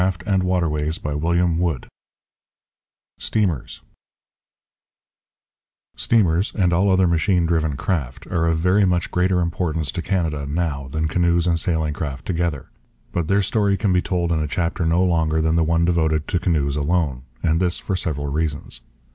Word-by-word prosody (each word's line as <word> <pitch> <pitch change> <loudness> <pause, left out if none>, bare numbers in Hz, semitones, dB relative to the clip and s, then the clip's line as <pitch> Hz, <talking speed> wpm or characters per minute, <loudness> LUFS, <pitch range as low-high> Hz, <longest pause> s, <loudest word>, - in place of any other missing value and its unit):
CHAPTER 95 +1 0
VIII 85 -1 0 1.6
STEAMERS 95 - -1 2.1
Steamers 95 -4 +2
and 90 -4 +2
all 95 +4 +3
other 95 0 +4
machine 85 +1 +2
driven 80 -4 0
craft 70 -7 -3
are 85 -2 0
of 80 -1 +2
very 90 +5 +3
much 90 -2 +1
greater 90 0 +2
importance 80 -4 -1
to 85 - -4
Canada 80 -7 -1
now 70 -3 -2
than 80 +3 -1
canoes 85 +1 +2
and 85 -2 +2
sailing 80 -3 0
craft 70 -3 -5
together. 85 -6 -2 0.4
But 85 -3 -2
their 100 +2 +2
story 100 0 +1
can 100 -3 +1
be 90 - +3
told 85 -2 -1
in 80 - +1
a 75 - -1
chapter 85 +1 -1
no 85 +3 +3
longer 80 -3 +1
than 80 +1 +1
the 85 - +3
one 85 +1 +2
devoted 80 -3 +1
to 90 - +1
canoes 75 -6 0
alone; 75 -3 0 0.2
and 80 0 +2
this 90 -1 +1
for 95 - -3
several 75 -5 -2
reasons. 70 -4 -2
85 Hz, 150 wpm, -22 LUFS, 80-90 Hz, 2.1 s, other